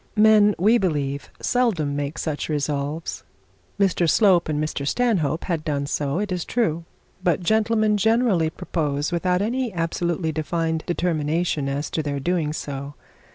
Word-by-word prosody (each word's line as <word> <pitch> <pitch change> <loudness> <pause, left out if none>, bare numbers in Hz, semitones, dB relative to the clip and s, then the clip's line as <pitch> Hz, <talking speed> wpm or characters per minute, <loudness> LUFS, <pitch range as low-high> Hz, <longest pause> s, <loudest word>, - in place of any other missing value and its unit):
Men 210 -1 +6
we 220 +7 +4
believe 145 -7 -2
seldom 190 - +1
make 145 +2 -3
such 155 -1 -3
resolve. 145 +1 -2 0.6
Mr 180 -4 +2
Slope 185 -6 +4
and 150 -1 0
Mr 150 -2 -2
Stanhope 175 - +1
had 165 -4 -2
done 145 -3 -1
so, 140 +1 -1
it 205 0 -2
is 180 -2 -1
true; 170 -9 -1 0.4
but 180 +1 +2
gentlemen 215 +1 +2
generally 220 -6 +2
propose 150 -4 -2
without 180 +2 +1
any 245 +2 -1
absolutely 170 -1 -1
defined 160 +1 -2
determination 165 -3 0
as 140 +2 -3
to 160 - -1
their 145 -2 -3
doing 165 0 0
so. 140 -1 -6
165 Hz, 145 wpm, -23 LUFS, 150-200 Hz, 0.6 s, Men